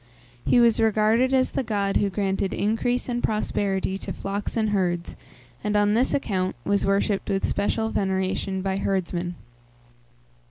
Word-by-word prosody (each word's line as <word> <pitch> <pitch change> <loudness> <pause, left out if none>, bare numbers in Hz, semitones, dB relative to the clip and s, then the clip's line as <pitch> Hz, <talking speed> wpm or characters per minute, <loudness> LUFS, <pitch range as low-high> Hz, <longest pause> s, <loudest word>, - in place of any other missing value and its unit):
He 245 - +4
was 235 -2 +4
regarded 225 +3 +3
as 260 -1 +2
the - - -1
god 205 -4 0
who 205 - +1
granted 195 -1 -1
increase 225 +4 0
and 240 -1 -2
prosperity 195 -3 -1
to - - -6
flocks 200 +3 -4
and 215 -2 +1
herds, 175 -4 -1 0.5
and, 210 0 -1
on 205 0 +3
this 245 +4 +2
account, 190 -9 -1
was 200 -1 +1
worshipped 195 0 +1
with 195 0 0
special 220 +2 0
veneration 190 0 -1
by 190 0 -1
herdsmen. 180 -3 -2
200 Hz, 150 wpm, -25 LUFS, 190-220 Hz, 0.5 s, He